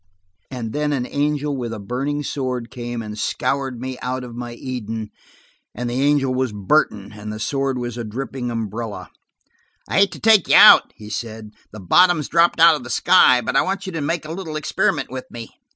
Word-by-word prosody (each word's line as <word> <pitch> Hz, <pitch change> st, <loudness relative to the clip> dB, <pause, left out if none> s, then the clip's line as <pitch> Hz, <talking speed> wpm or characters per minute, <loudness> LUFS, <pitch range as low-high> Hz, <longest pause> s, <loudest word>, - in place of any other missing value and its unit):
And 120 Hz, -4 st, -6 dB
then 150 Hz, 0 st, -1 dB
an 125 Hz, -3 st, -1 dB
angel 145 Hz, +1 st, -1 dB
with 120 Hz, -3 st, -4 dB
a 115 Hz, -, -5 dB
burning 135 Hz, +8 st, -3 dB
sword 125 Hz, -5 st, -4 dB
came 120 Hz, -1 st, -5 dB
and 105 Hz, 0 st, -7 dB
scourged 135 Hz, -1 st, -2 dB
me 130 Hz, 0 st, -6 dB
out 130 Hz, 0 st, -3 dB
of 120 Hz, -1 st, -9 dB
my 120 Hz, 0 st, -6 dB
Eden. 115 Hz, -4 st, -6 dB, 0.6 s
And 125 Hz, +2 st, -4 dB
the 125 Hz, +2 st, -1 dB
angel 140 Hz, -2 st, +2 dB
was 130 Hz, -2 st, -1 dB
Burton, 105 Hz, -1 st, 0 dB
and 105 Hz, 0 st, -7 dB
the 110 Hz, -, -6 dB
sword 135 Hz, +3 st, -1 dB
was 120 Hz, -1 st, -5 dB
a -, -, -3 dB
dripping 125 Hz, +3 st, -5 dB
umbrella. 110 Hz, -5 st, -5 dB, 0.8 s
"I -, -, +1 dB
hate 200 Hz, 0 st, +4 dB
to -, -, -10 dB
take 220 Hz, -4 st, +4 dB
you -, -, +4 dB
out," -, -, +8 dB
he 105 Hz, 0 st, -11 dB
said. 110 Hz, 0 st, -6 dB, 0.2 s
"The 110 Hz, -, -10 dB
bottom's 170 Hz, -, +3 dB
dropped 170 Hz, +1 st, +3 dB
out 165 Hz, 0 st, +8 dB
of 150 Hz, -, -7 dB
the -, -, -9 dB
sky; 130 Hz, -9 st, +5 dB
but -, -, -3 dB
I -, -, +5 dB
want 195 Hz, +1 st, -3 dB
you 190 Hz, -, -5 dB
to 165 Hz, -3 st, -4 dB
make 160 Hz, +2 st, -2 dB
a 155 Hz, -, -7 dB
little 165 Hz, -4 st, -6 dB
experiment 155 Hz, -4 st, -1 dB
with 130 Hz, 0 st, -7 dB
me." 115 Hz, -1 st, -9 dB
125 Hz, 205 wpm, -21 LUFS, 115-145 Hz, 0.8 s, out